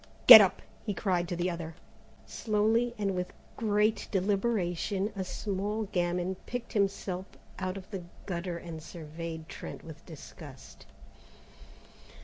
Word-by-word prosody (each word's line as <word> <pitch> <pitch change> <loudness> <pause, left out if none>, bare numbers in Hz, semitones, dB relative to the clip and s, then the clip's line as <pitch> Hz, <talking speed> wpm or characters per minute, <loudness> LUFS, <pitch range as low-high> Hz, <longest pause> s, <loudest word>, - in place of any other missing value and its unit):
"Get - - +14
up," - - +1 0.2
he 205 -3 -3
cried 180 -4 0
to 175 - -3
the 175 +1 -1
other. 165 -1 -6 0.5
Slowly 225 +3 +1
and 200 -2 0
with 180 0 -3 0.2
great 210 0 +1
deliberation, 195 0 0
a 190 - -2
small 205 +3 -3
gamin 180 +1 -1
picked 245 -1 -5
himself 195 -2 -1 0.3
out 185 +1 -3
of 190 - -9
the 195 -3 -4 0.2
gutter 175 -1 -3
and 165 -2 -8
surveyed 160 0 -7
Trent - - -8
with 160 -2 -11
disgust. 150 -3 -12
185 Hz, 130 wpm, -30 LUFS, 170-205 Hz, 0.5 s, Get